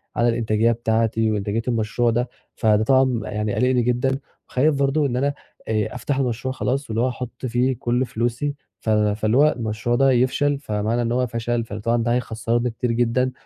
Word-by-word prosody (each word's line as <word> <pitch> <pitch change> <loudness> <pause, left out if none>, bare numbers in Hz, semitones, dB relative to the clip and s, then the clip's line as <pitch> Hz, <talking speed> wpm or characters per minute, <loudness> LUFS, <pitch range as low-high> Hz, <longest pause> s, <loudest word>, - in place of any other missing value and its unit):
على 120 0 +3
الإنتاجية 115 -1 +2
بتاعتي 115 -1 +1
وانتاجية 105 +2 -1
المشروع 120 0 +1
ده، 120 +2 0 0.3
فده 110 -1 +3
طبعًا 130 -1 +3
يعني 105 -1 -2
قالقني 125 -1 +2
جدًا 125 +3 0 0.3
وخايف 145 +4 +2
برضه 140 +2 +1
إن 125 -3 -1
أنا 135 +2 +1 0.4
آآ 110 +1 -1
أفتح 130 +3 -2
المشروع 130 -1 -1
خلاص 135 +1 -2
واللي 110 +1 0
هو 130 - +2
أحط 125 0 -6
فيه 125 +2 +1
كل 125 0 0
فلوسي 120 +5 -2 0.2
ف - - -4
فاللي 105 +1 +2
هوالمشروع 120 -5 +1
ده 135 +2 +4
يفشل، 130 +3 +2
فمعنى 110 -2 -1
إن 115 0 -1
هو 125 +1 +1
فشل 115 0 -2
فطبعًا 115 +2 -1
ده 120 +1 +1
هيخسرّني 120 0 -1
كتير 120 +1 -2
جدًا 120 +2 +1
120 Hz, 175 wpm, -22 LUFS, 110-130 Hz, 0.4 s, ده